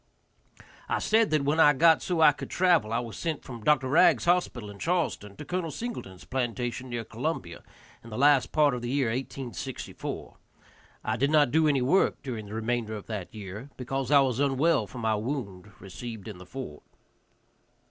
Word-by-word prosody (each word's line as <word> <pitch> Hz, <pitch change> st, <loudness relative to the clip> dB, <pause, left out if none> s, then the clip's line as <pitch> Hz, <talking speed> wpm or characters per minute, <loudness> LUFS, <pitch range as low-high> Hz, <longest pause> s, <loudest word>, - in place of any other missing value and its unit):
I -, -, +1 dB
said 220 Hz, 0 st, +3 dB
that 155 Hz, -2 st, +1 dB
when 145 Hz, +3 st, +1 dB
I 145 Hz, -2 st, +7 dB
got 160 Hz, +3 st, +5 dB
so 175 Hz, -3 st, -1 dB
I 155 Hz, -2 st, +8 dB
could 145 Hz, -, -8 dB
travel 175 Hz, -12 st, +3 dB
I 115 Hz, -, +1 dB
was 120 Hz, -2 st, -4 dB
sent 160 Hz, -4 st, -3 dB
from 120 Hz, -4 st, -9 dB
Dr. 135 Hz, -2 st, +3 dB
Ragg's 165 Hz, +9 st, +4 dB
hospital 170 Hz, -12 st, +1 dB
in 100 Hz, -, -13 dB
Charleston 165 Hz, -, -1 dB
to 150 Hz, -, -9 dB
Col. 175 Hz, +2 st, -2 dB
Singleton's 150 Hz, -, -6 dB
plantation 125 Hz, 0 st, -3 dB
near 120 Hz, -1 st, -3 dB
Columbia, -, -, -4 dB, 0.4 s
in 115 Hz, -, -11 dB
the 110 Hz, -, -6 dB
last 140 Hz, 0 st, +4 dB
part 150 Hz, -3 st, +4 dB
of 125 Hz, -, -3 dB
the 120 Hz, -, -4 dB
year 135 Hz, -2 st, +1 dB
1864. 125 Hz, -2 st, -5 dB, 0.7 s
I 110 Hz, +1 st, -1 dB
did 140 Hz, +4 st, +2 dB
not 150 Hz, -4 st, +4 dB
do 160 Hz, 0 st, +4 dB
any 140 Hz, -4 st, +2 dB
work 140 Hz, 0 st, +2 dB
during 115 Hz, -6 st, -5 dB
the 105 Hz, -, -7 dB
remainder 115 Hz, -1 st, -2 dB
of 105 Hz, -, -8 dB
that 105 Hz, -5 st, -5 dB
year, 105 Hz, +5 st, -8 dB
because 135 Hz, +1 st, -3 dB
I 145 Hz, -1 st, +6 dB
was 130 Hz, -2 st, 0 dB
unwell 140 Hz, -2 st, +2 dB
from 120 Hz, -, -8 dB
my 110 Hz, -1 st, +1 dB
wound 105 Hz, -4 st, -4 dB
received 110 Hz, +3 st, -8 dB
in 105 Hz, -5 st, -8 dB
the 90 Hz, -, -12 dB
fort. 115 Hz, -, -7 dB
130 Hz, 190 wpm, -28 LUFS, 110-150 Hz, 0.7 s, I